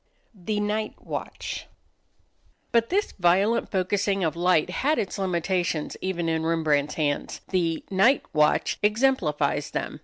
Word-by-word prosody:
] - - -42 0.2
The 210 -1 +1
Night 210 +1 -1
Watch - - -6 1.0
But 230 -1 +2
this 405 +3 0
violent 195 +6 +2
focusing 195 0 0
of 160 -1 0
light 175 -1 +2
had 295 +11 +1
its 200 0 -2
limitations 175 -3 -1
even 175 -3 -2
in 160 0 0
Rembrandt's 155 -3 +1
hands. 145 -2 -2
The 170 -4 0
"Night 210 +8 +4
Watch" 150 -1 +2
exemplifies 190 - +1
them. - - -4
185 Hz, 130 wpm, -25 LUFS, 160-210 Hz, 1.0 s, Night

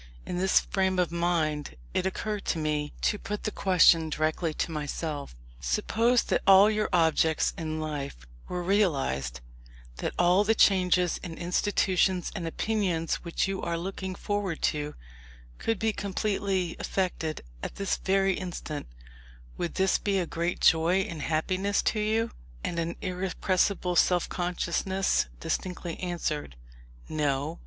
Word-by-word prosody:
In 175 - -3
this 190 0 +4
frame 190 -1 0
of 180 -2 +1
mind 160 - 0 0.2
it 190 - +1
occurred 210 +2 -3
to - - 0
me 150 -1 -1
to 210 - +1
put 210 -1 -5
the 215 - -1
question 170 -5 +4
directly 155 +2 0
to 170 - -2
myself: 150 - -4 0.2
"Suppose 225 - +2
that - - 0
all 195 +2 +8
your 215 0 0
objects 160 -2 +3
in 155 -1 -3
life 145 - -5 0.2
were 180 0 -3
realized; 135 - +1 0.6
that - - -3
all 180 +3 +4
the 220 +2 +2
changes 180 -4 +3
in 165 -3 -7
institutions 185 0 +1
and 175 -5 -4
opinions 175 -3 0
which 170 +2 -1
you 195 -1 -3
are 170 0 -1
looking 190 +1 -4
forward 205 -5 -2
to, 150 0 -4 0.6
could 225 - 0
be 220 +2 0
completely 195 -3 -1
effected 170 -5 -2 0.2
at - - -5
this 200 -1 -1
very 195 0 +2
instant: 175 -5 -5 0.7
would 170 - -3
this 190 0 +2
be 200 -1 0
a 180 - +1
great 170 +2 -2
joy 165 +4 +4
and 170 -5 -5
happiness 185 +6 0
to 215 - +1
you?" 220 +2 +1 0.3
And 170 - -2
an 170 +1 -2
irrepressible 185 0 0
self 175 0 +3
consciousness 180 - 0
distinctly 175 - -3
answered, 160 - -3 0.5
"No!" 150 +1 -1
180 Hz, 140 wpm, -28 LUFS, 160-195 Hz, 0.7 s, all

